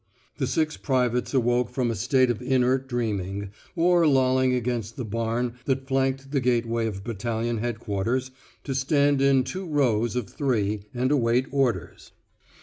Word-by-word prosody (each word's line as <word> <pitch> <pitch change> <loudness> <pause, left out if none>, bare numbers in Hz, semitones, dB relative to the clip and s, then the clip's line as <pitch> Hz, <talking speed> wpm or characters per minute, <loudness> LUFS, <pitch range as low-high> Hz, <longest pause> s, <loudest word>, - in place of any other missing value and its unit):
The - - 0
six 155 0 0
privates 125 -3 0
awoke 120 -2 +2
from 125 -3 -1
a - - -3
state 130 +4 +2
of 120 - -5
inert 130 +1 +1
dreaming, 100 -5 -2 0.2
or 175 -1 +4
lolling 130 -2 +3
against 120 -3 -2
the 125 - -4
barn 115 +2 -1
that 135 -1 -1
flanked 135 0 0
the 145 - +1
gateway 115 -2 +1
of 100 -3 -5
battalion 115 +1 -2
headquarters, 120 +2 -2 0.3
to 135 - -3
stand 140 +1 +2
in 135 -1 +4
two 185 +7 -5
rows 120 -7 +1
of 125 -5 -2
three 105 -7 -1
and 125 +2 0
await 125 -2 +2
orders. 135 -4 -1
125 Hz, 150 wpm, -25 LUFS, 115-135 Hz, 0.3 s, or